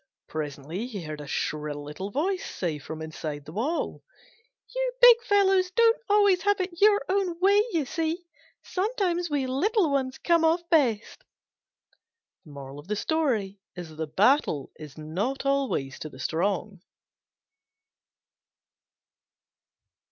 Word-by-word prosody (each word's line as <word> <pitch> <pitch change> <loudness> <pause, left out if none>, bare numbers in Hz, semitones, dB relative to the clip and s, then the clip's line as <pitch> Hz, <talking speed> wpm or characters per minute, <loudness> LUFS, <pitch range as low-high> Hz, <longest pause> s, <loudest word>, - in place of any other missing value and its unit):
Presently 155 - -5
he 205 -8 -6
heard 155 -1 -6
a 145 - -9
shrill 150 -1 -3
little 150 +7 -6
voice 360 - -1
say 160 -5 -3
from 160 +2 -7
inside 155 -2 -6
the - - -10
wall, 255 - -2 0.7
"You - - -1
big 485 -1 +8
fellows 390 -4 +3
don't 460 +4 +3
always 405 -3 +4
have 410 +2 +2
it 360 -1 -4
your 415 0 +5
own 370 -3 0
way, 400 +3 +5
you 320 -6 0
see: 325 +5 -2 0.4
sometimes 370 -4 -1
we 285 -3 0
little 330 - +1
ones 265 -2 -1
come 340 -1 +2
off 335 +2 +2
best." 270 - +1 1.2
The 180 - -3
battle 210 - +3
is 150 -2 -10
not 195 - -3
always 265 - 0
to 155 - -6
the - - -14
strong. 190 +2 -2
270 Hz, 115 wpm, -26 LUFS, -, 1.2 s, big